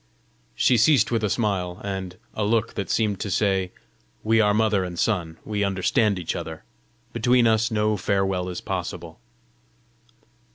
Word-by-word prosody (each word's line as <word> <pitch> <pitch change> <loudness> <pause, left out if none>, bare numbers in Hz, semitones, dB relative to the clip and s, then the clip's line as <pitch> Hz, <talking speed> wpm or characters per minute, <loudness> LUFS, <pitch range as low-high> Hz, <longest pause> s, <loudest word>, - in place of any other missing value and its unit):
She 125 - +3
ceased 125 +2 +4
with 115 -2 0
a 105 - +1
smile 95 -5 -1
and 95 -2 -5 0.2
a 110 - -2
look 115 +2 +1
that 100 -3 -4
seemed 105 -3 0
to 105 - -3
say, 95 -2 +1 0.5
"We 110 +1 +3
are 105 -1 +3
mother 105 -2 +2
and 90 -1 -6
son; 85 -7 -1
we 105 -1 -1
understand 100 +2 +1
each 85 -3 -3
other! - - -6 0.5
Between 120 +1 +3
us 110 0 +3
no 105 -1 +1
farewell 95 -1 0
is 90 - -5
possible." 90 0 -5
100 Hz, 155 wpm, -24 LUFS, 95-110 Hz, 0.5 s, ceased